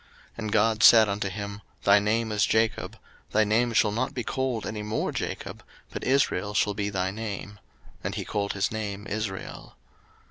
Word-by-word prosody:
01:035:010 -, -, -31 dB
And 110 Hz, -2 st, -3 dB
God 110 Hz, 0 st, +2 dB
said 110 Hz, -1 st, +8 dB
unto 100 Hz, 0 st, -1 dB
him, 100 Hz, +1 st, -6 dB, 0.2 s
Thy 100 Hz, +1 st, +6 dB
name 110 Hz, +2 st, 0 dB
is 105 Hz, -1 st, +2 dB
Jacob: 110 Hz, 0 st, 0 dB, 0.4 s
thy 110 Hz, -, +5 dB
name 115 Hz, +3 st, +2 dB
shall 110 Hz, -2 st, +3 dB
not 130 Hz, +6 st, -2 dB
be 125 Hz, -, -2 dB
called 130 Hz, -4 st, -2 dB
any 110 Hz, -1 st, -4 dB
more 105 Hz, +1 st, -2 dB
Jacob, -, -, -5 dB, 0.3 s
but -, -, -6 dB
Israel 105 Hz, -7 st, +1 dB
shall 105 Hz, +2 st, +2 dB
be 100 Hz, 0 st, -2 dB
thy 95 Hz, -2 st, -1 dB
name: 105 Hz, -1 st, -6 dB, 0.4 s
and -, -, -3 dB
he -, -, -4 dB
called 100 Hz, -1 st, -2 dB
his 100 Hz, -1 st, 0 dB
name 105 Hz, -2 st, -4 dB
Israel. 105 Hz, -3 st, -5 dB
105 Hz, 180 wpm, -27 LUFS, 100-110 Hz, 0.4 s, said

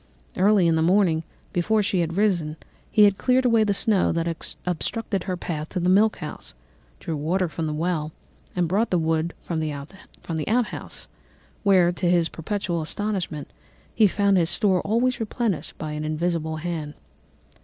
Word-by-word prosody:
Early 200 Hz, -1 st, +4 dB
in 165 Hz, -, +4 dB
the 160 Hz, -, +2 dB
morning, 175 Hz, -2 st, +3 dB, 0.3 s
before 210 Hz, +5 st, +2 dB
she 190 Hz, -2 st, 0 dB
had 165 Hz, +1 st, -1 dB
risen, 175 Hz, -7 st, +1 dB, 0.3 s
he 210 Hz, -1 st, +6 dB
cleared 255 Hz, +6 st, +1 dB
away 230 Hz, -3 st, +4 dB
the 210 Hz, -, +1 dB
snow 210 Hz, -2 st, +3 dB
that 165 Hz, 0 st, -2 dB, 0.2 s
obstructed 190 Hz, +3 st, -2 dB
her 185 Hz, -2 st, -2 dB
path 155 Hz, -3 st, -4 dB
to 185 Hz, -, -3 dB
the 180 Hz, +1 st, +2 dB
milk 215 Hz, +3 st, +4 dB
house, 150 Hz, -, -7 dB, 0.4 s
drew 160 Hz, -, -4 dB
water 175 Hz, +5 st, 0 dB
from 160 Hz, 0 st, -4 dB
the 155 Hz, -, -2 dB
well, 160 Hz, -1 st, -1 dB, 0.4 s
and 180 Hz, -2 st, +1 dB
brought 205 Hz, +7 st, +1 dB
the 180 Hz, -, +2 dB
wood 160 Hz, 0 st, 0 dB
from 165 Hz, -2 st, -3 dB
the 155 Hz, -1 st, -1 dB, 0.8 s
outhouse, 235 Hz, +1 st, -2 dB, 0.5 s
where, 185 Hz, -4 st, +4 dB
to 175 Hz, 0 st, -1 dB
his 170 Hz, -2 st, +3 dB
perpetual 175 Hz, -1 st, -3 dB
astonishment, 175 Hz, -4 st, -3 dB, 0.4 s
he 215 Hz, -2 st, +5 dB
found 200 Hz, 0 st, +2 dB
his 170 Hz, -2 st, +2 dB
store 190 Hz, -3 st, +2 dB
always 240 Hz, +4 st, +1 dB
replenished 225 Hz, -4 st, -2 dB
by 155 Hz, -1 st, -5 dB
an 150 Hz, 0 st, -4 dB
invisible 160 Hz, 0 st, -1 dB
hand. 155 Hz, -2 st, -4 dB
175 Hz, 165 wpm, -24 LUFS, 160-205 Hz, 0.8 s, he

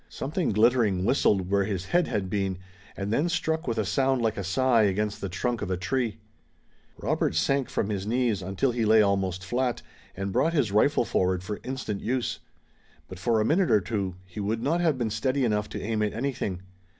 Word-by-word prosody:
Something 160 Hz, +5 st, -2 dB
glittering 105 Hz, -3 st, +3 dB
whistled 100 Hz, -6 st, +2 dB
where 100 Hz, -1 st, +3 dB
his 95 Hz, -3 st, -3 dB
head 175 Hz, -, +2 dB
had 100 Hz, -2 st, -2 dB
been, 95 Hz, -1 st, -1 dB, 0.4 s
and 100 Hz, +2 st, -2 dB
then 155 Hz, +8 st, +1 dB
struck 160 Hz, -3 st, -1 dB
with 115 Hz, -, -1 dB
a 110 Hz, -, +1 dB
sound 135 Hz, +5 st, +1 dB
like 110 Hz, -2 st, 0 dB
a 100 Hz, -, -4 dB
sigh 120 Hz, +5 st, +3 dB
against 105 Hz, +1 st, 0 dB
the 100 Hz, -, -3 dB
trunk 120 Hz, +6 st, -2 dB
of -, -, -3 dB
a 95 Hz, -, 0 dB
tree. 115 Hz, +4 st, -1 dB, 0.8 s
Robert -, -, 0 dB
sank 135 Hz, +10 st, +1 dB
from 100 Hz, -, -1 dB
his 100 Hz, -1 st, -3 dB
knees, 115 Hz, -3 st, +1 dB
until 95 Hz, +8 st, 0 dB
he 120 Hz, -1 st, -1 dB
lay 110 Hz, 0 st, +6 dB
almost 95 Hz, -2 st, 0 dB
fiat, 125 Hz, +4 st, -1 dB, 0.3 s
and 95 Hz, +1 st, -3 dB
brought 165 Hz, -, +2 dB
his 135 Hz, -10 st, +1 dB
rifle 120 Hz, +5 st, +3 dB
forward 90 Hz, -3 st, 0 dB
for 105 Hz, +2 st, -5 dB
instant 130 Hz, -6 st, -4 dB
use. 125 Hz, +1 st, -1 dB, 0.7 s
But, 95 Hz, -, -9 dB
for 115 Hz, +3 st, +2 dB
a 110 Hz, -, +2 dB
minute 175 Hz, -, +2 dB
or 105 Hz, -, +5 dB
two, 100 Hz, -2 st, -3 dB
he 95 Hz, +2 st, -9 dB
would 110 Hz, +3 st, -2 dB
not 165 Hz, +5 st, +1 dB
have 160 Hz, -6 st, +2 dB
been 115 Hz, -3 st, -1 dB
steady 130 Hz, +5 st, 0 dB
enough 105 Hz, -2 st, 0 dB
to -, -, -5 dB
aim 110 Hz, 0 st, -2 dB
at 105 Hz, -1 st, 0 dB
anything. 110 Hz, -7 st, -3 dB
110 Hz, 205 wpm, -27 LUFS, 100-130 Hz, 0.8 s, lay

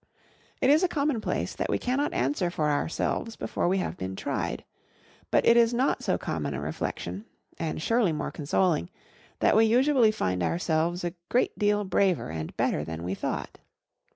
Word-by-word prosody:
It 260 Hz, -, +5 dB
is 305 Hz, +3 st, +5 dB
a 365 Hz, -, +3 dB
commonplace, 285 Hz, -8 st, -1 dB
that -, -, -2 dB
we -, -, +2 dB
cannot 270 Hz, +4 st, 0 dB
answer 145 Hz, +8 st, 0 dB
for 155 Hz, -4 st, 0 dB
ourselves 165 Hz, +9 st, -1 dB
before -, -, -2 dB
we 190 Hz, +2 st, +2 dB
have 185 Hz, -, -3 dB
been 95 Hz, 0 st, -4 dB
tried. -, -, -3 dB, 0.6 s
But -, -, +3 dB
it 230 Hz, -, +6 dB
is 235 Hz, 0 st, +4 dB
not 260 Hz, +3 st, +1 dB
so -, -, +1 dB
common -, -, -3 dB
a -, -, -3 dB
reflection, 205 Hz, -, -4 dB, 0.3 s
and 160 Hz, -2 st, -2 dB
surely 225 Hz, +2 st, +2 dB
more 155 Hz, -, -3 dB
consoling, 150 Hz, -, 0 dB, 0.5 s
that -, -, +4 dB
we 220 Hz, +1 st, +6 dB
usually 250 Hz, +1 st, +4 dB
find 90 Hz, -, -1 dB
ourselves 170 Hz, -, 0 dB
a 175 Hz, -1 st, -2 dB, 0.2 s
great 250 Hz, -, +1 dB
deal 205 Hz, 0 st, +2 dB
braver 185 Hz, -, +1 dB
and 80 Hz, -1 st, -6 dB
better 75 Hz, -, +1 dB
than 80 Hz, +2 st, -6 dB
we 90 Hz, +2 st, -2 dB
thought. -, -, -4 dB
185 Hz, 175 wpm, -27 LUFS, 150-235 Hz, 0.6 s, it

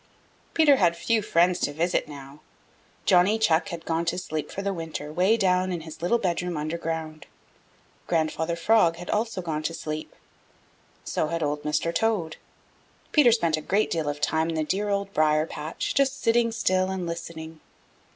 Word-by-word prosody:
Peter 300 Hz, -4 st, +6 dB
had 170 Hz, -5 st, +2 dB
few 225 Hz, +5 st, +1 dB
friends 175 Hz, -2 st, +2 dB
to -, -, 0 dB
visit 165 Hz, +4 st, 0 dB
now. 140 Hz, -1 st, -11 dB, 0.7 s
Johnny 185 Hz, +4 st, +4 dB
Chuck 190 Hz, -4 st, +2 dB
had 170 Hz, -3 st, -7 dB
gone 165 Hz, 0 st, 0 dB
to 170 Hz, +1 st, -1 dB
sleep 155 Hz, -4 st, -4 dB
for 195 Hz, -, -5 dB
the 200 Hz, 0 st, -1 dB
winter 160 Hz, -3 st, -6 dB
'way 190 Hz, +7 st, +3 dB
down 185 Hz, -2 st, +2 dB
in 175 Hz, -2 st, -3 dB
his 160 Hz, 0 st, -10 dB
little 180 Hz, +8 st, +2 dB
bedroom 180 Hz, -4 st, -2 dB
under 155 Hz, +2 st, -3 dB
ground. 160 Hz, -2 st, -5 dB, 0.8 s
Grandfather 160 Hz, 0 st, 0 dB
Frog 170 Hz, -1 st, +3 dB
had 175 Hz, +1 st, -6 dB
also 215 Hz, -3 st, -1 dB
gone 155 Hz, -3 st, -2 dB
to 165 Hz, +2 st, -3 dB
sleep. 155 Hz, -1 st, -6 dB, 0.9 s
So 155 Hz, -, -1 dB
had 165 Hz, 0 st, -2 dB
Old 145 Hz, 0 st, -1 dB
Mr. 150 Hz, +3 st, -1 dB
Toad. 190 Hz, -6 st, 0 dB, 0.7 s
Peter 285 Hz, -6 st, +6 dB
spent 170 Hz, -9 st, +2 dB
a -, -, -4 dB
great 200 Hz, +7 st, 0 dB
deal 160 Hz, -3 st, -1 dB
of 145 Hz, 0 st, -4 dB
time 160 Hz, +2 st, +1 dB
in 165 Hz, -, -2 dB
the 155 Hz, -, 0 dB
dear 200 Hz, +6 st, -1 dB
Old 200 Hz, 0 st, -1 dB
Briar 155 Hz, 0 st, +3 dB
patch 155 Hz, 0 st, -4 dB
just 275 Hz, +2 st, +1 dB
sitting 230 Hz, 0 st, +2 dB
still 185 Hz, -4 st, +1 dB
and 190 Hz, -2 st, -3 dB
listening. 165 Hz, -1 st, -7 dB
170 Hz, 180 wpm, -26 LUFS, 155-195 Hz, 0.9 s, Peter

